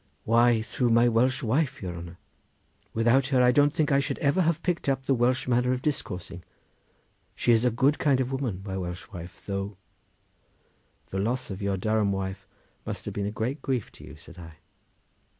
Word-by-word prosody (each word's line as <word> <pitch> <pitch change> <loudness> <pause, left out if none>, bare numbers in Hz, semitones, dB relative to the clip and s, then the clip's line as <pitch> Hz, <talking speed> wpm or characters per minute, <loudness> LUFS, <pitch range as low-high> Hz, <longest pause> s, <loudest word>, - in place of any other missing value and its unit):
"Why, 115 0 +4
through 125 +2 -1
my 115 +1 +5
Welsh 125 +3 +2
wife, 135 +4 0
your 90 -3 -5
honour! 85 +1 -9 0.7
Without 120 +4 +3
her 130 -3 +3
I 125 - +6
don't 145 +3 +4
think 150 0 0
I 140 - +4
should 140 - -2
ever 145 +6 +2
have 165 -1 0
picked 175 -5 -1
up 135 -1 -1
the 135 - +2
Welsh 125 +1 +1
manner 125 +1 +2
of 130 0 -4
discoursing—she 90 - -5
is 115 +1 +4
a - - +5
good 135 +6 +2
kind 140 -3 +3
of 130 0 -1
woman, 125 -9 -3
my 95 -2 -3
Welsh 90 0 -6
wife, 85 0 -10
though—" 100 0 -4 1.3
"The 95 - -3
loss 120 +3 -1
of 95 +1 -6
your 100 -1 0
Durham 110 +1 +1
wife 95 0 -4 0.4
must - - -6
have - - -4
been 100 0 -2
a - - -3
great 120 +7 -3
grief 130 -6 -2
to - - -15
you," - - -11
said 85 +4 -14
I. 80 -2 -11
120 Hz, 190 wpm, -27 LUFS, 100-135 Hz, 1.3 s, I